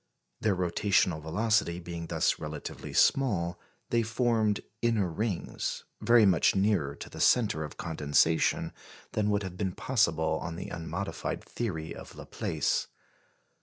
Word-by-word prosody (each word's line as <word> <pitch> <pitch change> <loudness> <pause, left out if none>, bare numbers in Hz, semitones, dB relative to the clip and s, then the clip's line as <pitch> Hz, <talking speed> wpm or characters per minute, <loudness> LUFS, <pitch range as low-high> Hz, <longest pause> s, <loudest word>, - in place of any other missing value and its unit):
Their 105 -3 +2
rotational 90 -2 +1
velocity 95 +1 +1
being 85 -1 -6
thus - - +1
relatively 75 -1 -6
small, 90 -11 +2 0.3
they 120 - +3
formed 110 -2 +1 0.2
"inner 115 -5 +2
rings," 95 +2 -3 0.2
very 115 0 +6
much 95 -1 +4
nearer 95 -8 +1
to - - -8
the - - -10
centre 105 -9 +3
of 75 - -8
condensation 80 0 +1 0.4
than 105 -1 0
would 105 0 +1
have 90 -1 -6
been 95 -2 -1
possible 80 -12 +1
on 85 -1 -4
the 90 - -6
unmodified 85 +4 -4
theory 85 -9 -4
of - - -11
Laplace. - - -1
95 Hz, 130 wpm, -29 LUFS, 80-110 Hz, 0.4 s, very